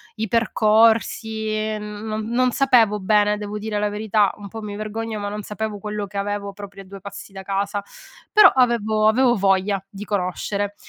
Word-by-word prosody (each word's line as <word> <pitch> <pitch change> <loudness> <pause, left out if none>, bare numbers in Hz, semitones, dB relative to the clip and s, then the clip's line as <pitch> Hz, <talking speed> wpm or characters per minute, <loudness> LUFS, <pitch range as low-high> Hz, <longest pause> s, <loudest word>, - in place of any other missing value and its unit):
i 220 0 -3
percorsi, 220 -1 +2
non 210 +1 -5
non 250 +1 +2
sapevo 235 -6 +3
bene, 210 +1 +2
devo 210 0 -5
dire 210 0 -3
la 210 0 0
verità, 210 -1 +1
un 205 - -9
po' 225 +2 -8
mi 210 -1 -6
vergogno, 215 +1 -4
ma 205 0 -3
non 210 +1 -5
sapevo 215 0 -4
quello 210 0 -4
che 200 +1 -8
avevo 200 0 -3
proprio 195 -1 -10
a - - -19
due 195 +1 -10
passi 200 +1 -9
da 190 0 -8
casa, 200 +1 -2 0.5
però 425 -1 +9
avevo 220 -4 +2
avevo 240 +2 +4
voglia, 195 -1 +1
di 200 +1 -8
conoscere. 200 +1 -2
210 Hz, 175 wpm, -22 LUFS, 200-220 Hz, 0.5 s, però